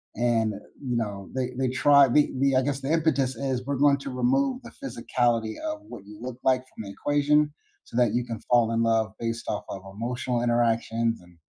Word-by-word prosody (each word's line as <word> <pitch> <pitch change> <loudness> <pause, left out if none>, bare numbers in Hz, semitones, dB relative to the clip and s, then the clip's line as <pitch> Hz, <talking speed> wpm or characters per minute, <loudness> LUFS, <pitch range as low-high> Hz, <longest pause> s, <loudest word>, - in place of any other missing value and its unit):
and, 115 -2 +1
eh, - - -7 0.2
you 125 -3 -1
know, 100 -4 -4
they 125 -1 -1
they 130 -1 +1
try 140 +3 +5
the 145 +4 +3
the 135 -1 +3
I 130 - +4
guess 140 0 -1
the 135 +3 -2
impetus 145 -6 +1
is, 130 0 -2
"We're 140 +1 -1
going 140 +1 +4
to 140 - -6
remove 255 - +1
the 235 - -10
physicality 120 - -1
of 310 0 -4
what 100 - -10
you 105 0 -12
look 125 0 -6
like 130 -1 +3
from - - -7
the 100 - -8
equation 145 +3 +2 0.3
so - - -8
that 120 -3 +3
you 120 0 0
can 115 -3 -5
fall 120 -2 +4
in 115 0 +1
love 110 -2 +1
based 115 0 -3
off - - -2
of 95 - -6
emotional 120 +1 -2
interactions 115 -1 +1
and 90 -1 -20
125 Hz, 215 wpm, -26 LUFS, 115-140 Hz, 0.3 s, try